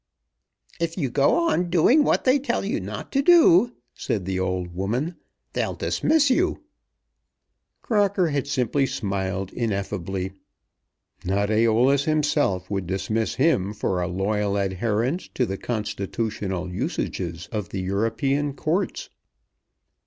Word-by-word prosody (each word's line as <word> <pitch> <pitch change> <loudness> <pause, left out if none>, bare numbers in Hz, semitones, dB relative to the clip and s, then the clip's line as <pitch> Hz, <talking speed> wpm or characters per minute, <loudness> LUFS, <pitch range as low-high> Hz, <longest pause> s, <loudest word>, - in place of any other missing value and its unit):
'" - - -59 0.3
"If 170 +1 -2
you 135 -8 -1
go 145 - +3
on 175 - 0
doing 205 - +5
what - - +2
they 260 +2 +4
tell 275 - -1
you - - -1
not - - -7
to 275 - +2
do," 245 - +6 0.2
said 100 -5 -3
the 95 0 -2
old 90 -1 -2
woman, 120 - -2 0.4
"they'll - - -1
dismiss 300 -3 +2
you." 350 +8 +1 1.2
Crocker 200 -5 +2
had 140 -2 -1
simply 135 0 +1
smiled 95 -3 -3
ineffably. 95 -4 -2 0.9
Not 100 +2 0
Æolus 115 +5 +3
himself 145 - +1
would 95 -3 -2
dismiss 100 +4 -1
him 130 - +2
for 95 -3 -1
a 90 - -1
loyal 100 +2 -1
adherence 110 - -1
to 125 - +2
the 95 -2 -4
constitutional 100 -4 -3
usages 85 -1 -3
of 105 -3 -4
European 115 +9 -1
Courts. 175 +7 -2
110 Hz, 125 wpm, -24 LUFS, 95-155 Hz, 1.2 s, do